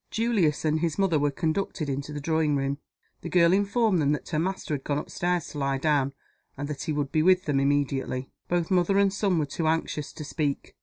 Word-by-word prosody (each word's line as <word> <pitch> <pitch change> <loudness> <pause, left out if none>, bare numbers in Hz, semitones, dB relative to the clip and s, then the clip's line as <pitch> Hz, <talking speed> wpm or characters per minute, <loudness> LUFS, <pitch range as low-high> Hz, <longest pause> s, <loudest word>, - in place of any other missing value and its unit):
Julius 210 -11 +1
and 155 0 +2
his 165 -2 -1
mother 190 -6 +2
were 145 0 +2
conducted 160 +2 -2
into 140 +2 -3
the 150 - -4
drawing 155 0 +1
room. 140 +1 -1 0.4
The 170 - -5
girl 170 -1 +4
informed 200 -1 +2
them 145 0 +2
that 150 - -5
her 155 - 0
master 185 -2 -2
had 135 -2 -3
gone 145 - -1
up 150 - -5
stairs 175 -2 -1
to 145 - -6
lie 135 -1 0
down, 140 -2 +1 0.4
and 145 +1 -4
that 145 -2 -5
he - - -2
would 145 -2 -2
be 155 - +2
with 185 +2 +4
them 145 -2 +1
immediately. 135 -2 0 0.2
Both 175 -1 0
mother 185 +1 +3
and 200 -1 +3
son 195 -3 +1
were 155 - +1
too 155 +3 -2
anxious 155 -2 -1
to 155 - -7
speak. 145 -1 -3
155 Hz, 225 wpm, -27 LUFS, 145-180 Hz, 0.4 s, girl